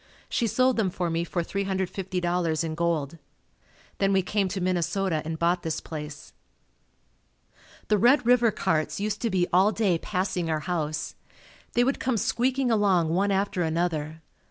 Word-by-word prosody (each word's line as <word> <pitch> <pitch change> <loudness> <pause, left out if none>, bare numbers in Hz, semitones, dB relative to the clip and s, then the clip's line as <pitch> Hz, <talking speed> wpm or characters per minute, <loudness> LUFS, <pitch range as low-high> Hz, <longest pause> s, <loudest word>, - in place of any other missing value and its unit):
She 235 - 0
sold 255 +3 +2
them 210 -4 +2
for 175 -1 -2
me 165 +1 0
for 175 0 -2
$350.00 180 -3 -1
in 160 -1 -3
gold. 165 -2 -1 0.8
Then 195 0 +2
we 190 -1 +3
came 200 +1 0
to 190 +1 -3
Minnesota 180 -1 0
and 160 +1 -4
bought 175 +2 +1
this 160 -2 -2
place. 150 -2 -8 1.5
The 210 -1 +2
Red 245 +4 +4
River 240 -1 +5
carts 160 -6 -1
used 210 0 -2
to 230 - 0
be 185 -3 +2
all 190 +4 +5
day 195 -7 +1
passing 185 -3 -2
our 155 -1 0
house. 155 -3 -3 0.6
They 240 - +3
would 270 +3 0
come 255 -3 0
squeaking 255 +3 +1
along 195 -7 +3
one 190 +5 +1
after 195 -1 0
another. 160 -1 -2
180 Hz, 155 wpm, -26 LUFS, 165-205 Hz, 1.5 s, River